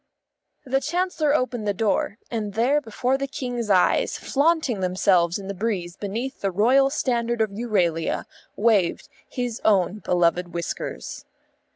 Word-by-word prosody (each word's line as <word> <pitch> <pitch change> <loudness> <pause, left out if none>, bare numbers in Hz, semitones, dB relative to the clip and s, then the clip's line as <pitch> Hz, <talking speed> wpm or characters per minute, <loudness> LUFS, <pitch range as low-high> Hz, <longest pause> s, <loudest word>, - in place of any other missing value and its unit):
The 270 +1 +1
Chancellor 315 -1 0
opened 245 -6 -1
the 205 - 0
door; 210 0 0
and 210 -4 -3
there 265 +6 +2
before 250 +2 -1
the 275 - -2
King's 245 -4 -4
eyes, 185 -3 +3
flaunting 290 - +1
themselves 180 -2 +2
in 195 -1 -8
the 200 - -3
breeze 185 -4 -3
beneath 230 +8 -5
the 195 - +1
Royal 250 +9 +4
Standard 240 -4 -1
of 220 -2 +1
Euralia, 190 -7 0 0.3
waved 205 -5 +2 0.2
his 245 -3 -4
own 200 -1 +2
beloved 175 -1 +1
whiskers. 165 - -5
220 Hz, 140 wpm, -24 LUFS, 190-255 Hz, 0.3 s, Royal